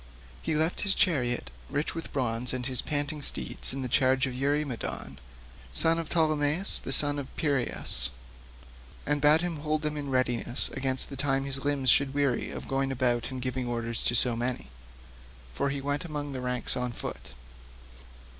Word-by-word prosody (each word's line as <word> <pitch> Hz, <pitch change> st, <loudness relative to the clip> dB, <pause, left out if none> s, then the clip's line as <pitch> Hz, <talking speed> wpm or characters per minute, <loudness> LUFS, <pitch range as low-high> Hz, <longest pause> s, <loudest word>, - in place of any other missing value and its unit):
He 160 Hz, -, -2 dB
left 160 Hz, +3 st, +1 dB
his 195 Hz, -2 st, +3 dB
chariot 120 Hz, -, +1 dB, 0.2 s
rich 145 Hz, +2 st, -2 dB
with 165 Hz, -, -7 dB
bronze 125 Hz, -2 st, +1 dB
and 125 Hz, -1 st, -3 dB
his 130 Hz, -2 st, 0 dB
panting 145 Hz, 0 st, -3 dB
steeds 65 Hz, -, 0 dB
in 130 Hz, -1 st, -3 dB
charge 130 Hz, +2 st, +3 dB
of 130 Hz, -, -4 dB
Eurymedon, 135 Hz, -, -3 dB, 0.5 s
son 165 Hz, -, +3 dB
of 165 Hz, -, -5 dB
Ptolemaeus 155 Hz, +2 st, +1 dB
the -, -, -6 dB
son 145 Hz, +1 st, +6 dB
of 135 Hz, -, -6 dB
Peiraeus, 140 Hz, -6 st, 0 dB, 1.0 s
and 145 Hz, 0 st, 0 dB
bade 150 Hz, +3 st, +6 dB
him 175 Hz, -2 st, -2 dB
hold 155 Hz, +1 st, -2 dB
them 150 Hz, 0 st, -2 dB
in 145 Hz, -1 st, -4 dB
readiness 125 Hz, -2 st, 0 dB
against 135 Hz, -1 st, +2 dB
the -, -, -5 dB
time 135 Hz, 0 st, 0 dB
his 135 Hz, 0 st, -4 dB
limbs 140 Hz, -3 st, +3 dB
should 140 Hz, -1 st, +3 dB
weary 140 Hz, -4 st, 0 dB
of -, -, -7 dB
going 135 Hz, 0 st, 0 dB
about 120 Hz, -2 st, 0 dB
and 130 Hz, -1 st, -6 dB
giving 130 Hz, -1 st, -3 dB
orders 115 Hz, -1 st, -3 dB
to 120 Hz, -, +2 dB
so 120 Hz, -1 st, +7 dB
many, 120 Hz, -, -3 dB, 0.8 s
for 140 Hz, -, -1 dB
he 140 Hz, 0 st, -3 dB
went 145 Hz, +4 st, -2 dB
among 150 Hz, -4 st, -5 dB
the 130 Hz, -2 st, -5 dB
ranks 125 Hz, -1 st, -3 dB
on 125 Hz, -1 st, -2 dB
foot. -, -, -7 dB
135 Hz, 175 wpm, -28 LUFS, 125-145 Hz, 1.0 s, so